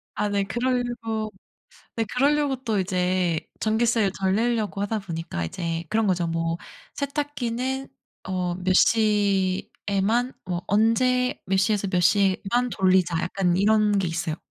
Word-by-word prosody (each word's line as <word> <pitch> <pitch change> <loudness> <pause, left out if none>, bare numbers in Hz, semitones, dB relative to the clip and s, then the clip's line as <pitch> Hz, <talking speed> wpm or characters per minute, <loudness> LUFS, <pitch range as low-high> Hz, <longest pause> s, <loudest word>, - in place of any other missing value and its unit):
아 210 0 0
네. 200 -1 +1
그럴려고 240 -1 -2 0.7
네 225 - +1
그럴려고 280 0 +1
또 220 -4 0
이제 180 -3 0 0.2
전기세를 220 -2 +1
덜 190 +1 +2
내려고 225 -3 0
하다 210 +2 -1
보니까 165 - -4
이제 165 - -3
그런 220 0 +2
거죠. 180 -3 +1
뭐 165 0 -1 0.4
"세탁기는 270 -2 -3 0.4
어 180 -2 -1
몇 185 +1 0
시에만 205 +2 +1
뭐 175 -2 -3
언제 250 +4 +2
몇 190 +1 +1
시에서 200 0 +1
몇 185 -1 +1
시에만 200 +6 +2
돌리자." 185 -4 +2
약간 180 0 0
이런 210 0 +3
게 190 - 0
있어요. 165 -1 -2
205 Hz, 270 characters per minute, -24 LUFS, 185-235 Hz, 0.7 s, 이런